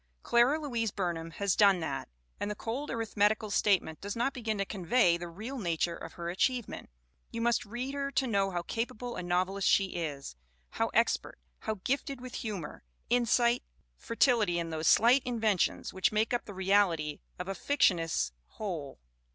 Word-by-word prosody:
Clara 245 +6 +4
Louise 240 -7 -1
Burnham 175 -4 -3
has 195 +3 0
done 200 -3 +5
that; 135 - -4 0.3
and - - -2
the 210 - -3
cold 250 +8 -4
arithmetical 215 -1 +1
statement 190 -7 +2
does 200 0 -4
not 240 +4 0
begin 225 -4 -2
to 200 - 0
convey 190 -1 +2
the 175 0 -5
real 220 +11 -6
nature 170 -3 0
of 165 - -9
her 170 -1 -6
achievement. 245 +5 -1 0.4
You 230 - -5
must 235 0 +1
read 245 +6 -4
her 280 0 -2
to 270 - +2
know 200 -5 +1
how 175 -2 -3
capable 240 +3 -4
a - - -4
novelist 185 +2 0
she 195 -1 +4
is, 145 - -4 0.4
how - - 0
expert, - - +1 0.2
how 220 - -3
gifted 275 0 -1
with 250 0 -9
humor, 200 -8 -5 0.3
insight, 240 0 +3 0.3
fertility 225 - +2
in 165 -1 -2
those 160 0 -2
slight 245 +5 +6
inventions 225 -7 0
which 190 -1 +2
make 215 +3 +1
up 240 - -1
the 205 - -8
reality 185 -6 +2 0.2
of 180 - -5
a 195 - -2
fictionist's 175 - +1 0.2
whole. 165 - -5
205 Hz, 170 wpm, -31 LUFS, 175-240 Hz, 0.4 s, slight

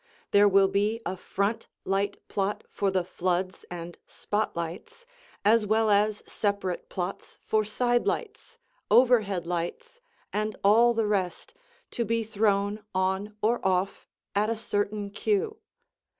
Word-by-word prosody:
There 205 0 +6
will 195 0 +5
be 205 +3 0
a 185 - -2
front 200 +4 -2 0.2
light 200 +1 -1
plot 200 +1 -2
for 200 - 0
the 190 -1 +1
"floods" 185 +1 -2
and 175 -1 -7
"spot 210 +1 -2
lights" 190 - -6 0.4
as 215 0 +4
well 220 0 +3
as 210 +1 +2
separate 200 -4 -2
plots 180 +1 -5
for 215 0 +2
side 240 +3 +1
lights, 460 +1 -3 0.3
overhead 215 -8 +4
lights, 180 - -4 0.3
and 215 0 -1
all 230 +4 +5
the 225 -1 +1
rest, 195 - -2 0.4
to 235 - -1
be 230 0 0
thrown 205 -1 0
on 190 +3 -1
or 235 +3 +2
off 190 0 0 0.3
at 210 +2 +2
a 230 - 0
certain 205 -1 -2
cue. 425 - 0
205 Hz, 135 wpm, -27 LUFS, 190-225 Hz, 0.4 s, There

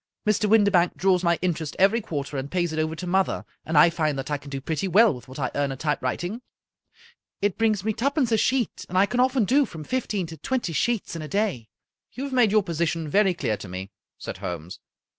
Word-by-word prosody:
Mr. 210 0 +2
Windibank 200 -5 +4
draws 185 -1 +2
my 170 -1 +3
inter 175 -3 0
est 150 - -6
every 200 +5 +4
quarter, 145 -8 -5
and 135 +1 -3
pays 175 -2 -1
it 155 - -2
over 155 +1 -1
to 180 - -6
mother, 190 +2 0 0.2
and 160 -1 -1
I 165 +3 +7
find 155 -4 0
that 135 +2 -5
I 145 - 0
can 140 - -12
do 135 -1 -4
pretty 160 +7 -2
well 210 +2 +5
with 125 0 -11
what 130 - -10
I 130 -3 -2
earn 140 -1 0
at 135 - -5
typewriting. 160 - -2 1.0
It 205 -1 0
brings 215 -4 +2
me 220 - +1
twopence 270 +1 0
a 225 - +4
sheet, 255 0 0
and 185 - -2
I 195 - +6
can 245 +4 -2
often 255 -2 +3
do 280 +7 +4
from 165 - -7
fifteen 210 - -2
to 160 0 -9
twenty 240 - -2
sheets 230 +1 -1
in 165 - -5
a 155 - -6
day." 195 - -1 0.4
"You 260 - -5
have 280 -1 -4
made 245 -4 +4
your 215 0 +3
position 165 -1 -1
very 195 +2 +3
clear 110 - -1
to 100 -2 -9
me," 95 +2 -6 0.3
said - - -7
Holmes. 85 0 -6
180 Hz, 235 wpm, -25 LUFS, 150-215 Hz, 1.0 s, I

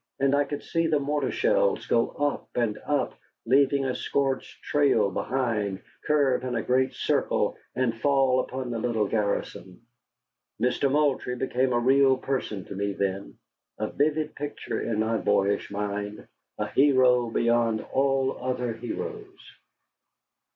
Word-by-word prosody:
And 140 0 +2
I 145 0 +3
could 145 +1 -5
see 165 0 0
the 155 -2 +2
mortar 145 -1 -1
shells - - +1
go 115 0 +2
up 145 0 -2
and 115 -4 0
up, 145 -2 0 0.3
leaving 140 +1 +3
a 130 - 0
scorched 135 0 -2
trail 140 -9 +2
behind, 105 -5 -2 0.2
curve 140 -4 +2
in 125 -1 -2
a 115 - -1
great 130 +1 +1
circle, - - 0 0.2
and 115 -3 -1
fall 135 -2 +3
upon 130 -1 -3
the 115 - -2
little 110 -3 0
garrison. 100 -3 -3 0.8
Mister 125 +2 +1
Moultrie 140 -3 +1
became 130 0 0
a 120 - +2
real 135 +2 +4
person 125 -8 -3
to 100 - -8
me 100 +1 -1
then, 100 0 -3 0.4
a - - -3
vivid 150 +1 0
picture 145 0 -5
in 110 -2 -1
my 110 +1 +1
boyish 100 -1 +1
mind 105 +1 -4 0.3
a 105 - -1
hero 125 -1 +4
beyond 115 -1 +1
all 135 0 +1
other 125 -2 -2
heroes. 400 - -7
130 Hz, 145 wpm, -26 LUFS, 115-140 Hz, 0.8 s, real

